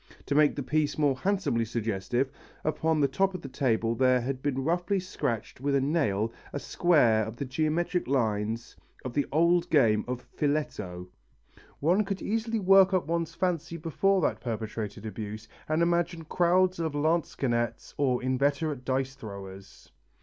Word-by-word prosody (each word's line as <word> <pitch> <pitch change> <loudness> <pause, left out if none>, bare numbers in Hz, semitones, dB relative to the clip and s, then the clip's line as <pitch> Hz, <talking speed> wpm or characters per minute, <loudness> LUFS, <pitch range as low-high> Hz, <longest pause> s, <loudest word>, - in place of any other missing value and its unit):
To 140 - -1
make 150 0 +4
the 140 - -3
piece 150 +2 0
more 145 -3 +2
handsomely 185 - 0
suggestive, 115 +3 -1 0.3
upon 155 +1 +1
the 140 - +4
top 195 +4 0
of 185 - -7
the - - -5
table 115 -4 0
there 130 +1 +3
had 130 +1 -3
been 135 -2 -1
roughly 175 +5 0
scratched 140 - -4
with 140 0 +1
a - - +4
nail 125 -7 0 0.2
a - - -3
square 130 -12 +3
of 110 +2 -6
the 140 - -4
geometrical 155 +3 -1
lines 115 -2 -1 0.3
of 125 - -4
the 145 +1 0
old 170 +3 +3
game 115 -8 +4
of 125 0 -4
"Filetto." 105 -12 -2 0.7
One 175 +8 +3
could 195 -1 -3
easily 225 +1 -1
work 195 -1 +5
up 185 - +1
one's 165 0 -2
fancy 170 -2 -1
before 185 +4 +1
that - - 0
perpetrated 110 -3 -4
abuse 110 0 -6 0.2
and 155 +2 +2
imagine 170 -1 0
crowds 180 +2 +2
of 160 -3 -1
lansquesnets 135 -7 -1
or 130 -3 +1
inveterate 140 +2 0
dice 130 +1 -1
throwers. 100 -5 -10
140 Hz, 155 wpm, -28 LUFS, 115-170 Hz, 0.7 s, work